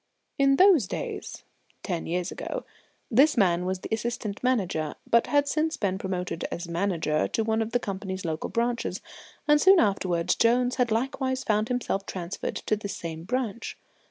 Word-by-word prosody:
In 275 0 +5
those 360 - +6
days - - -5 0.4
ten 175 -4 -3
years 180 +2 -1
ago - - -5 0.5
this 275 +6 +5
man 180 -3 +3
was 185 0 -2
the - - -7
Assistant 220 -2 -3
Manager, 190 -11 0
but 235 0 +4
had 285 -1 +2
since 310 +2 0
been 190 -2 -1
promoted 180 -3 -3
as 175 0 -5
Manager 170 -3 0
to 225 - -1
one 220 0 +1
of 225 0 -2
the 245 - +3
company's 190 -3 -5
local 160 -1 -3
branches; 235 0 -1 0.5
and 295 0 +5
soon 385 -1 +7
afterwards 185 -5 +1
Jones 245 +2 +2
had 250 -2 +2
likewise 260 +3 -1
found 215 0 +1
himself 235 -6 -2
transferred 180 0 -4
to - - 0
this 205 -1 -5
same 165 -1 -6
branch. 235 -1 -3
215 Hz, 165 wpm, -27 LUFS, 180-250 Hz, 0.5 s, soon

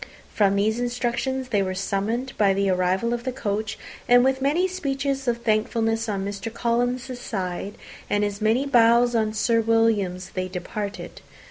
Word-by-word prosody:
From 200 -2 +3
these 215 +3 +1
instructions 245 +2 -2
they 205 -4 +2
were 185 -1 -2
summoned 220 +7 -2
by 200 -2 +3
the 195 0 +1
arrival 185 +6 +1
of 240 0 -3
the 255 - -2
coach; 215 -3 -3 0.3
and 245 0 +7
with 265 0 +1
many 310 +7 +2
speeches 275 -6 -2
of 235 0 -1
thankfulness 225 +1 0
on 195 -2 -2
Mr. 200 +2 -5
Collins's 245 +2 -1
side, 195 -2 -4 0.3
and 205 0 +2
as 205 +1 -4
many 225 +6 +2
bows 240 -2 +4
on 220 -2 +1
Sir 230 +2 +2
William's, 215 -5 +1
they 185 0 -3
departed. 200 +3 -6
225 Hz, 160 wpm, -24 LUFS, 200-245 Hz, 0.3 s, and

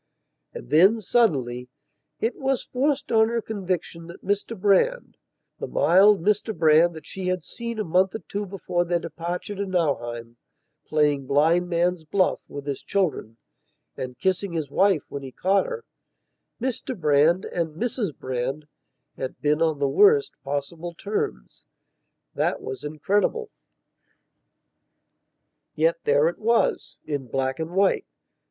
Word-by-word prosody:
And - - -10
then, 190 +9 +6
suddenly, 130 - +1 0.5
it 230 - -1
was 270 -1 -1
forced 280 +2 -1
on 220 -1 +4
her 235 0 0
conviction 185 -6 -4
that 170 - -12
Mr 205 +2 -2
Brandthe 210 - +2 0.5
mild 195 +1 +4
Mr 210 +2 0
Brand 160 +2 +5
that 155 -2 -10
she 190 -1 -5
had 185 -1 -1
seen 235 -1 -6
a 215 - -1
month 185 +2 +2
or 220 - -6
two 205 0 -4
before 180 -2 -1
their 175 0 0
departure 170 +3 -5
to 200 0 -3
Nauheim, 120 -11 -2 0.5
playing 145 -3 +1
"Blind 165 +6 +3
Man's 175 0 +1
Buff" 185 +4 +1
with 145 -1 -7
his 140 -2 -4
children 160 - -1 0.6
and 125 -1 -6
kissing 190 +3 -1
his 155 -4 -3
wife 190 -1 +3
when 140 - -6
he 135 -1 -8
caught 190 +8 +1
herMr 260 - -8
Brand 155 +4 +3
and 165 -3 -3
Mrs 230 - -2
Brand 130 +3 -3 0.5
had 130 - -5
been 150 +1 +1
on 160 -2 +2
the 140 0 +1
worst 420 - +5
possible 150 +5 -4
terms. 60 - -4 0.7
That - - 0
was 130 - -7
incredible. 205 - -1 2.2
Yet - - +2
there 480 +1 +4
it - - -3
wasin 155 - -1
black 130 +2 -1
and 165 +2 -4
white. 195 0 +2
175 Hz, 135 wpm, -24 LUFS, 150-210 Hz, 2.2 s, then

